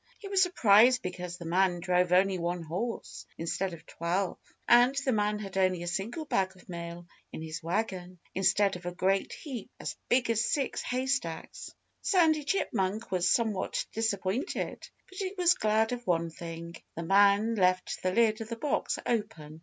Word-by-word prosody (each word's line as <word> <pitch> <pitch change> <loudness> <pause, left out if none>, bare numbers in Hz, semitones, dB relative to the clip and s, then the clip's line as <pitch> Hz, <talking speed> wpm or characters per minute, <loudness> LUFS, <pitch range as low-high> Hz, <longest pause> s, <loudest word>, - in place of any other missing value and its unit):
He 405 - -9
was 390 -1 +2
surprised 250 - +5
because 180 -1 -5
the 170 - -9
man 180 +1 +2
drove 180 0 +1
only 185 +1 +3
one 175 0 -2
horse, 190 +9 -5
instead 180 +3 -2
of 165 -2 -11
twelve. 175 +4 -2 0.3
And 245 +3 +6
the 265 - +2
man 210 -2 +1
had 195 -2 -6
only 185 -2 +2
a - - -5
single 205 - -3
bag 190 -8 0
of 180 - -19
mail 170 0 -7 0.3
in 160 - -6
his 160 +1 -6
wagon, 180 0 -3 0.2
instead 195 +1 +2
of 175 0 -8
a 175 - -4
great 195 +2 +1
heap 255 -9 -7
as - - -4
big 245 -1 +3
as 225 0 +1
six 275 +2 -1
haystacks. 255 -9 -3 0.3
Sandy 320 -5 +3
Chipmunk 220 - -1
was 180 -1 +2
somewhat 220 -5 0
disappointed. 220 - -2 0.2
But 375 - -11
he 385 0 -3
was 355 -1 +5
glad 220 -5 +1
of 245 -1 -5
one 170 -2 +1
thing: 170 +1 -8 0.2
The 170 - -4
man 200 +4 +4
left 185 -3 +1
the 185 - 0
lid 220 +2 +2
of 225 - -6
the 230 - -3
box 290 +4 -1
open. 155 -9 -3
195 Hz, 175 wpm, -29 LUFS, 175-235 Hz, 0.3 s, And